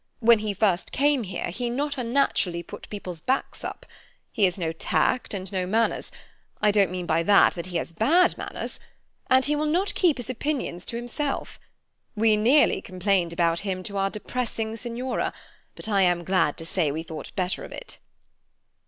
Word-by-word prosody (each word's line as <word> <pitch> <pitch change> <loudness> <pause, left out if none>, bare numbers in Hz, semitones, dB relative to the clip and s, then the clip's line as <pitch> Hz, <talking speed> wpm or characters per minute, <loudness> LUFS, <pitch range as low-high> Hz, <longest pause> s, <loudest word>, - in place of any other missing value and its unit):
When 235 -1 +6
he 210 -1 -2
first 195 -3 +1
came 285 -1 +2
here 180 -2 -4
he 240 +6 -3
not 285 +4 -1
unnaturally 235 -9 0
put - - -10
people's 180 -5 -6
backs 265 +7 -1
up. - - -6 0.5
He 215 -5 +3
has 180 0 0
no 165 -3 -1
tact 205 +8 0
and 190 -2 -4
no 185 -2 -1
manners—I 215 0 -1
don't 200 -3 +3
mean 180 0 -4
by 165 0 +2
that 200 +4 +5
that 170 0 -6
he 175 -2 -2
has 170 - -4
bad 330 - +4
manners—and 260 0 -2
he 295 - +2
will 305 +1 0
not 360 +6 +1
keep 340 -7 +3
his 245 -3 -6
opinions 255 - -3
to - - -2
himself. 245 +4 -3 0.6
We 220 0 +4
nearly 245 +8 +4
complained 185 -2 0
about 170 0 +1
him 185 -2 -3
to 200 +2 -4
our 195 0 +1
depressing 225 +1 -3
Signora, 240 +2 -3 0.4
but - - -4
I 200 -3 +2
am 175 -2 +3
glad 170 -5 +1
to 165 - -6
say 165 -3 +1
we 160 +3 -4
thought 160 -1 -8
better 185 -2 -1
of - - -9
it." - - -8
205 Hz, 180 wpm, -25 LUFS, 180-250 Hz, 0.6 s, When